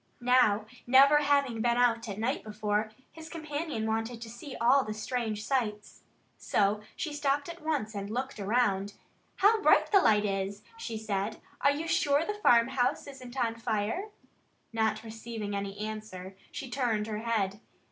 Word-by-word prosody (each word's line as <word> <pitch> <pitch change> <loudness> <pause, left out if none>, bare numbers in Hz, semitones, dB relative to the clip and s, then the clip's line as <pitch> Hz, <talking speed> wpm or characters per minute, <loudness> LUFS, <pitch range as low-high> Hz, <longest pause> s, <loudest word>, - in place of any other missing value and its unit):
Now, 240 -4 +3 0.2
never 275 +4 +7
having 280 -5 +2
been 240 +1 +2
out 235 -2 +2
at 200 - -5
night 225 +3 -1
before, 215 0 -1 0.2
his 320 0 -11
companion 310 -7 -4
wanted 225 +2 -2
to 225 - -9
see 255 +4 -9
all 255 +4 +5
the 215 -2 -5
strange 220 -1 -3
sights. 215 -6 -2 0.4
So 205 +1 +1
she 310 -3 -4
stopped 285 -1 0
at 340 +1 -8
once 290 -9 -1
and 200 -1 -5
looked 255 +2 -3
around. 205 -2 +1 0.4
"How 425 +2 +4
bright - - +4
the 395 -2 +6
light 210 - +4
is!" 195 +1 -2
she 345 - -5
said. 215 0 -2 0.2
"Are 280 - +5
you 300 +3 -1
sure 290 -1 +2
the 420 - -2
farmhouse 245 - +3
isn't 260 -2 -10
on 235 -3 +1
fire?" 225 - -2 0.6
Not 220 -1 0
receiving 225 -2 -5
any 200 0 -4
answer, 210 -3 -6 0.2
she 275 - -6
turned 240 -4 0
her 215 -1 -4
head. 210 -4 -1
230 Hz, 160 wpm, -30 LUFS, 210-275 Hz, 0.6 s, never